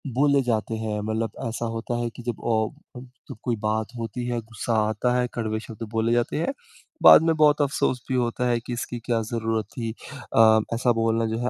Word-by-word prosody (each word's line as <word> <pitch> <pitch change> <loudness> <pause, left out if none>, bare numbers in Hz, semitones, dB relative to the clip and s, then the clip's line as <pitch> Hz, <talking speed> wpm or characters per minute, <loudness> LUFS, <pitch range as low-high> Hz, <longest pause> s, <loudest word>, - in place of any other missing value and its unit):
बोले 140 0 +4
जाते 115 -2 -1
हैं 110 -1 -3
मतलब 110 +1 -2 0.2
ऐसा 115 +1 -3
होता 120 +1 -3
है 120 - -1
कि 120 - -9
जब 120 -2 -4
अ, 115 +4 -2
उ - - -9 0.3
तो 135 - -8
कोई 120 -2 0
बात 110 +1 -1
होती 115 +1 -4
है 120 -1 -1
गुस्सा 110 +1 -4 0.2
आता 115 +3 0
है 125 - +1
कड़वे 110 -2 -2
शब्द 115 0 -9
बोले 115 0 +1
जाते 120 +3 0
हैं 220 - -1 0.5
बाद - - +10
में 165 -1 +2
बहुत 150 -1 +4
अफ़सोस 130 -3 0
भी 130 - 0
होता 120 0 0
है 120 -1 +2
कि 120 +1 -6
इसकी 120 0 -4
क्या 115 -2 +1
ज़रूरत 115 -1 -2
थी? 115 -3 -4 0.4
अ, 110 0 +7
ऐसा 120 +1 +2
बोलना 115 0 +1
जो 110 0 -2
है 125 +1 -1
115 Hz, 215 wpm, -25 LUFS, 110-125 Hz, 0.5 s, बाद